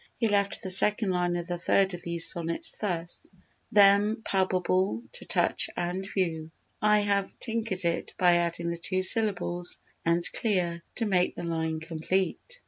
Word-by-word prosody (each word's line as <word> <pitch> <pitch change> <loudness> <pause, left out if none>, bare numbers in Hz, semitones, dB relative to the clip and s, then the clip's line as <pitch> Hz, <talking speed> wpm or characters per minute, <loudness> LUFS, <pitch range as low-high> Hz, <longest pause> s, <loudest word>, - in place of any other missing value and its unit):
He 230 - 0
left 200 -1 +2
the 190 - +2
second 210 +2 +6
line 175 -1 -1
of 175 -1 -4
the 175 0 -5
third 190 +2 +1
of 175 - -7
these 170 -1 +4
sonnets 165 -1 +3
thus: 175 -5 -4 0.4
"Them 205 +2 +4
palpable 185 +2 -1
to - - -9
touch - - +1
and 180 +3 -4
view." 160 -4 -3 0.3
I 210 0 +3
have 200 -1 -1
"tinkered" 225 -5 -3
it 170 0 -3
by 175 -1 +4
adding 170 0 -2
the 170 - -5
two 185 +2 -1
syllables 185 -5 +1 0.3
"and 170 +1 0
clear" 180 -6 -2
to 230 - -2
make 185 -3 0
the - - -7
line 160 -1 -3
complete. 185 - -3
185 Hz, 160 wpm, -27 LUFS, 170-200 Hz, 0.4 s, second